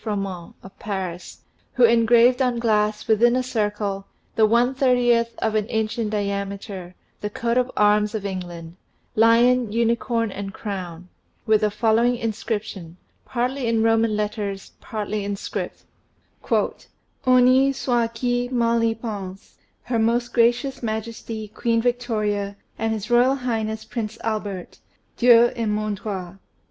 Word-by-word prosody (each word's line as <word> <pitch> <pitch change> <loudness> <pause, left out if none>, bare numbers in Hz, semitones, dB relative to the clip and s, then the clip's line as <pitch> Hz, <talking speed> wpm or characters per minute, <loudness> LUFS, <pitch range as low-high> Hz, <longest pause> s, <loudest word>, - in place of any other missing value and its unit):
Froment, 195 -5 -4
of 195 - -14
Paris, 185 -4 -5 0.3
who 250 - +2
engraved 235 +2 +5
on 250 -2 +1
glass, 215 -2 +1
within 235 +2 +4
a 255 - +1
circle, 210 -4 -2 0.3
the 220 -1 +5
one 240 +3 +3
thirtieth 245 -3 +2
of 220 - -1
an 215 -1 0
inch 220 0 -2
in 220 -2 -1
diameter, 200 -2 -4 0.2
the 210 - -3
Coat 235 +2 -1
of 250 0 +2
Arms 210 +1 +3
of 205 -2 -4
England 175 -3 -6 0.4
lion, 230 +1 +4
unicorn, 230 0 0
and 195 0 -6
crown 180 -4 -6 0.4
with 215 -2 +3
the 210 - +2
following 230 +3 +2
inscription, 215 -6 -4 0.3
partly 250 +1 -2
in 225 -1 +2
Roman 225 -1 +2
letters, 205 -2 -3
partly 210 -1 -4
in 200 0 -2
script: - - -5 0.3
" - - -41
Honi 255 +2 +2
soit 240 -3 -1
qui 245 +1 -1
mat 235 -2 +2
y 225 0 +1
pensc, 200 -4 -7 0.3
Her 240 -2 -1
Most 235 +2 +1
Gracious 245 +3 +2
Majesty, 220 -1 -4
Queen 230 +2 0
Victoria, 215 -4 -1 0.2
and 225 0 0
His 220 +1 -4
Royal 245 +3 +5
Highness, 220 -4 -3
Prince 225 -1 -5
Albert, 205 -5 -4 0.4
Dieu 240 -1 +6
et 230 -2 -2
man 210 0 -1
droit. 190 -3 -6
220 Hz, 140 wpm, -23 LUFS, 205-240 Hz, 0.4 s, Dieu